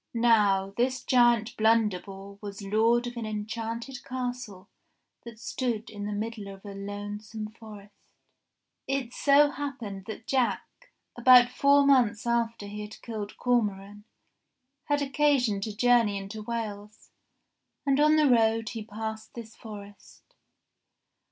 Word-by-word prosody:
Now 205 -4 +3
this 255 +2 0
giant 240 -2 +3
Blunderbore 200 -3 0
was 200 -1 -7
lord 225 +4 +2
of 240 0 -6
an 225 -2 -4
enchanted 225 +4 -5
castle 245 -6 -5 0.6
that 235 -2 -10
stood 230 -1 -3
in 205 -1 -6
the - - -3
middle 215 0 -4
of 195 +1 -11
a 200 - -7
lonesome 205 +2 -6
forest. 210 -2 -13 0.9
It 265 -3 -2
so 285 +1 +4
happened 245 -10 -6
that 220 +1 -7
Jack, 260 -3 0 0.5
about 245 0 +7
four 280 +2 +4
months 240 -6 +3
after 235 -2 0
he 205 +1 -7
had 210 +1 -9
killed 215 -3 -6
Cormoran, 205 -4 -1 0.8
had 290 -1 +1
occasion 270 -7 +2
to 210 0 -5
journey 235 -4 +3
into 195 +2 -7
Wales, 210 -2 -6 0.7
and 275 0 +2
on 305 +1 +5
the 305 -1 +4
road 225 -2 +3
he 225 -2 -6
passed 220 +1 -7
this 230 -2 -9
forest. 205 -2 -12
225 Hz, 130 wpm, -28 LUFS, 205-245 Hz, 0.9 s, about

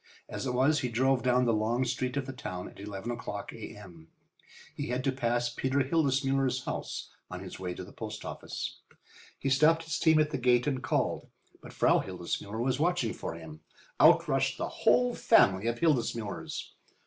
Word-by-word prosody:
As - - -4
it 125 - -1
was, 140 +4 +3
he 125 - -2
drove 130 +2 +2
down 125 0 +3
the 115 - +3
long 115 +4 +1
street 125 +2 -2
of 140 - -1
the 135 - -6
town 90 -8 -6
at - - -14
eleven 100 +2 -5
o'clock 105 -3 -5
A.M. 95 -7 -10 0.7
He - - -4
had 125 +1 -2
to 135 - +2
pass 120 -2 0
Peter 130 +3 0
Hildesmuller's 135 -3 +1
house - - -5 0.2
on 90 0 -6
his 95 -1 -8
way 90 -1 -4
to - - -6
the 95 - -12
post 110 -1 -7
office. - - -5 0.6
He 135 - -2
stopped 160 +5 +4
his 160 0 -3
team 160 -1 +5
at 155 -1 +3
the 135 - -2
gate 125 0 +3
and 135 -3 -1
called. - - -1 0.3
But - - -11
Frau - - +3
Hildesmuller 100 +4 -4
was 130 +1 0
watching 165 -8 +1
for - - -5
him. 80 -2 -10 0.4
Out - - +6
rushed - - +1
the - - -2
whole 245 0 +3
family 100 - +4
of 115 0 0
Hildesmullers. 120 -9 -1
125 Hz, 185 wpm, -30 LUFS, 105-135 Hz, 0.7 s, Out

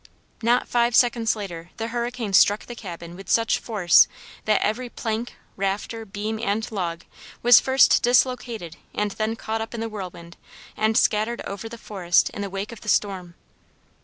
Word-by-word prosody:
Not 240 +2 +2
five 235 0 +2
seconds 240 -3 +3
later 175 -5 -7
the 225 0 -3
hurricane 240 -3 -3
struck 205 +2 +5
the 240 - -8
cabin 175 -6 -9
with 195 0 -11
such 230 -1 +2
force 195 -7 +4 0.4
that 215 -1 +3
every 240 +4 -1
plank, 225 +1 -4 0.2
rafter, 200 +3 -3
beam, 215 +2 -4
and 220 0 -1
log 175 -5 -3 0.4
was 245 0 +8
first 265 0 +4
dislocated 245 -7 +1 0.2
and 210 0 0
then 220 +2 -2
caught 225 0 -3
up 225 +1 -6
in - - -5
the 225 0 -3
whirlwind 180 -4 -8 0.4
and 220 +1 +1
scattered 215 +3 +2
over 200 +3 -6
the 235 - -9
forest 185 -6 +1
in - - -6
the 200 - -3
wake 195 +3 -5
of 230 - -11
the 210 - -6
storm. 185 -4 0
215 Hz, 170 wpm, -24 LUFS, 195-235 Hz, 0.4 s, was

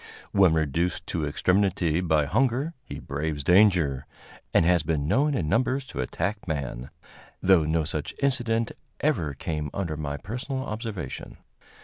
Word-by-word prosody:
When 95 -5 +5
reduced 80 +4 0
to 80 -4 -1
extremity 90 +1 +1
by 80 -4 +2
hunger, 130 - +1
he - - -8
braves 75 +1 -3
danger, 90 -7 +4 0.4
and 85 - +4
has 90 -1 +4
been 75 -2 -1
known 145 - +2
in 85 -11 -1
numbers 130 - +1
to 65 - -5
attack 100 - -3
man, 70 -4 -3 0.5
though 90 -4 +4
no 80 +1 +1
such 75 0 -4
incident 120 -5 +1 0.3
ever 75 -3 0
came 75 +1 -3
under 85 -6 -2
my 70 -1 -3
personal 130 - -4
observation. 105 - -5
85 Hz, 140 wpm, -26 LUFS, 75-110 Hz, 0.5 s, When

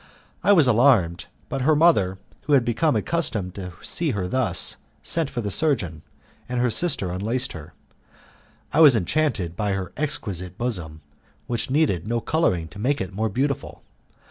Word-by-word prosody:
I - - +4
was 165 -8 +6
alarmed, 115 -8 +3 0.2
but 135 - -3
her 150 +4 +3
mother, 105 - +3 0.3
who 150 - +1
had 130 -4 +4
become 130 +7 +1
accustomed 110 - -2
to 90 -2 -7
see 165 -2 -1
her 90 -2 -2
thus, 105 -5 +1 0.3
sent 165 -4 0
for 125 -4 -4
the 100 -2 -3
surgeon, 95 - 0 0.5
and 125 0 -2
her 125 -1 +1
sister 110 - +1
unlaced 115 +9 -2
her. 80 -1 -11 1.0
I 150 - +2
was 150 -6 +8
enchanted 110 - 0
with 105 0 -1
her 95 -2 -5
exquisite 95 - -3
bosom, 90 -11 -3 0.4
which 120 0 -2
needed 130 - +1
no 120 +1 0
colouring 100 - 0
to 100 - -12
make 135 +6 0
it 95 +1 -5
more 110 +3 -1
beautiful. 140 +6 -3
115 Hz, 165 wpm, -23 LUFS, 90-145 Hz, 1.0 s, was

